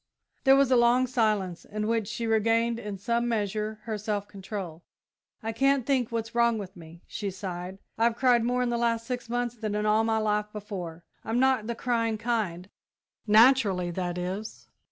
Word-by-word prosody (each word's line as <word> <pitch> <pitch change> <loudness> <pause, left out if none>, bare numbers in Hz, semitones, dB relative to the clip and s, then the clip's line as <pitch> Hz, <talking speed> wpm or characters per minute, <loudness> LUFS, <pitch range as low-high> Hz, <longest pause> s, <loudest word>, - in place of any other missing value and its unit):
There 270 0 +7
was 275 -1 +3
a - - +6
long 240 +1 +4
silence, 215 -8 0
in 210 0 -4
which 225 -2 0
she 230 +1 -4
regained, 230 +1 +2
in 205 -3 -6
some 235 +4 0
measure, 215 -1 -2
her 215 -1 -4
self 205 -1 -2
control. 190 -5 -7 0.6
"I 225 - -2
can't 270 +1 +2
think 255 -4 +1
what's 225 -1 -3
wrong 235 -1 +3
with 195 -2 -7
me," 170 0 -13
she 205 -2 -4
sighed. 185 -1 -6 0.2
"I've 230 0 +3
cried 245 -2 +3
more 250 +1 +1
in 245 - 0
the 235 0 -1
last 230 -1 0
six 245 -1 -5
months 245 0 -1
than 215 -2 -3
in 210 0 -1
all 215 +1 +3
my 225 0 +1
life 210 -1 0
before. 185 -6 -7 0.2
I'm 225 +2 -1
not 260 -4 +2
the 235 - -2
crying 230 -2 0
kind 210 -6 -2 0.6
naturally, 210 -5 +5
that 175 0 -3
is." 190 +4 -5
220 Hz, 185 wpm, -27 LUFS, 200-235 Hz, 0.6 s, There